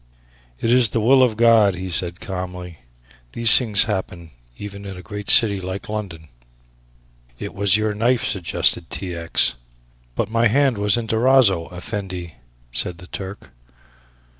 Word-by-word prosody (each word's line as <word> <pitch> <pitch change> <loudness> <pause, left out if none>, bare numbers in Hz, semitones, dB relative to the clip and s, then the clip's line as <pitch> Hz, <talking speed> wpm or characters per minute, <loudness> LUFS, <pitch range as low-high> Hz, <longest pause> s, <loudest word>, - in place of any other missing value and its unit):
"It 115 - 0
is 125 -2 +4
the 115 - -1
will 130 +5 +4
of 120 -4 +2
God," 115 -4 +4
he 95 +1 -6
said 85 +1 -2
calmly; 90 -3 -7 0.5
"these 115 -1 +4
things 110 -6 +4
happen 90 -5 -5 0.3
even 100 -1 -8
in 95 -2 -8
a 90 - -11
great 105 -2 -7
city 100 -4 +5
like 95 +4 -6
London." 95 -7 -6 1.1
"It 100 - -7
was 100 0 +2
your 110 0 -1
knife," 115 +4 +1
suggested 85 -2 0
T. 90 -2 -5
X. 85 -5 +1 0.6
"But - - -1
my 115 +1 +2
hand 130 -1 +1
was 105 +2 +2
in 120 - -3
Durazzo, 110 -6 +3
Effendi," 90 -3 -6 0.4
said 85 +8 -3
the 90 - -13
Turk. 95 +2 -9
100 Hz, 150 wpm, -21 LUFS, 90-115 Hz, 1.1 s, city